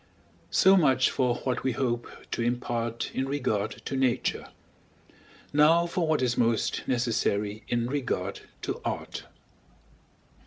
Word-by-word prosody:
So 190 +1 +6
much 135 -8 +4
for 125 -2 +1
what 130 - -1
we 130 - +1
hope 120 -1 -1 0.2
to - - -1
impart 120 -1 -2
in 135 +1 -1
regard 125 -7 -1
to - - -3
Nature; 130 -2 0 1.1
now 160 +4 +5
for 170 -1 -1
what 155 -4 +2
is 120 -1 +1
most 115 -2 +1
necessary 110 -4 0
in 120 -1 0
regard 120 -8 -2 0.2
to - - -3
Art. - - -4
125 Hz, 125 wpm, -28 LUFS, 115-135 Hz, 1.1 s, So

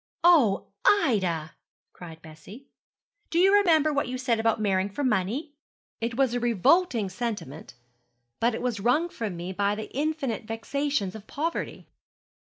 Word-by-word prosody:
'Oh, 295 - +4
Ida,' 185 - +2 0.4
cried 165 -2 -11
Bessie; 160 - -13 0.6
'do 335 - -2
you 380 +3 +5
remember 320 -7 +4
what 285 - 0
you 255 +1 -4
said 250 -3 0
about 225 0 +1
marrying 195 -2 +1
for 285 +9 -4
money?' 250 - -1 0.5
'It 230 +1 -3
was 265 -3 +2
a 245 - 0
revolting 240 - +2
sentiment; 205 - -6 0.6
but 235 0 +1
it - - -5
was 240 -4 -1
wrung 250 - +2
from 215 - -5
me 175 +2 -5
by 200 +2 0
the 215 0 -7
infinite 285 -6 -2
vexations 225 -1 -2
of 220 -1 -11
poverty.' 330 +4 -4
230 Hz, 150 wpm, -26 LUFS, 200-285 Hz, 0.6 s, you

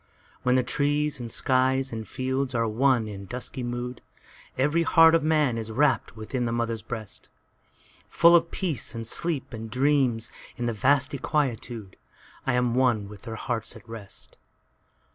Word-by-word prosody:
When 125 0 +2
the 130 - +3
trees 145 +3 0
and 120 -1 -5
skies 130 +2 +1
and 110 -1 -5
fields 130 0 -2
are 115 -1 +1
one 120 0 +2
in 100 -2 -8
dusky 125 +3 -5
mood, 120 0 -4 0.6
Every 150 +6 +2
heart 165 0 +6
of 165 - +4
man 150 -6 +2
is 110 0 -4
rapt 135 -3 +1
within 120 +3 -3
the 115 - -1
mother's 115 -1 -1
breast:Full 115 - -1
of 170 0 +3
peace 165 -10 -3
and 115 0 -4
sleep 155 +2 -2
and 110 0 -6
dreams 130 -3 +1 0.3
in 120 - -2
the 120 - 0
vasty 130 +4 +2
quietude,I 120 -4 -4
am 125 -1 +1
one 120 -5 +2
with 105 -1 -11
their 115 -2 -6
hearts 115 0 -4
at - - -14
rest. 110 -4 -10
125 Hz, 155 wpm, -26 LUFS, 115-140 Hz, 0.6 s, heart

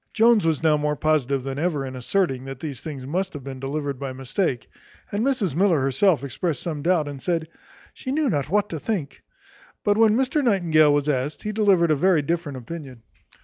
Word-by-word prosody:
Jones 225 -5 +4
was 160 -1 0
now 155 -2 +4
more 150 0 0
positive 140 -4 +1
than 135 +1 -4
ever 155 -4 -1
in 130 0 -7
asserting, 130 0 -1
that 135 -1 -7
these 145 -5 -6
things 140 -5 -7
must 185 +7 -2
have 145 -3 -7
been 135 -1 -7
delivered 140 0 -3
by 135 -2 -4
mistake; 135 - -2 0.4
and 205 +2 -1
Mrs 245 - 0
Miller 175 -1 +3
herself 140 +5 +2
expressed 140 +2 -3
some 155 -4 -3
doubt, 165 -2 +2
and 140 -2 -7
said, 165 -3 -1 0.5
"She 260 - -6
knew 300 +1 +1
not 145 - -1
what 205 +3 +2
to 160 - -4
think." 175 -7 -3 0.6
But 205 +1 +2
when 220 -1 +5
Mr 265 +3 +1
Nightingale 165 - +4
was 145 0 +1
asked, 145 +1 -1
he 215 - -2
delivered 195 -6 +3
a - - +4
very 170 0 +3
different 165 -3 -2
opinion. 130 -3 -9
155 Hz, 200 wpm, -24 LUFS, 140-190 Hz, 0.6 s, when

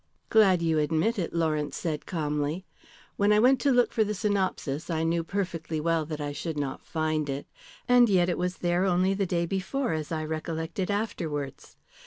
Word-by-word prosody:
"Glad 195 -6 +5
you 160 -2 +2
admit 160 +9 +1
it," 170 - -2
Lawrence 155 -4 -1
said 155 -3 -3
calmly. 150 +1 -2 0.5
"When 205 +1 +3
I 210 - +5
went 255 +4 +5
to 280 - +3
look 245 -1 +3
for 220 - +3
the 210 0 -2
synopsis 185 -8 -1
I 160 -1 0
knew 165 +1 +1
perfectly 165 -4 -3
well 165 -1 0
that 155 -1 -5
I 145 -1 -3
should 150 +2 -4
not 140 -2 -3
find 155 -2 -1
it. 140 +1 -3 0.4
And 245 -1 +6
yet 180 -3 +4
it 175 - -1
was 180 0 -1
there 175 +1 +1
only 185 +1 +2
the 195 -1 -1
day 170 -1 0
before, 195 +7 -1
as 155 0 -4
I 155 -1 -1
recollected 160 +3 -3
afterwards. 160 - -3
170 Hz, 190 wpm, -27 LUFS, 155-195 Hz, 0.5 s, And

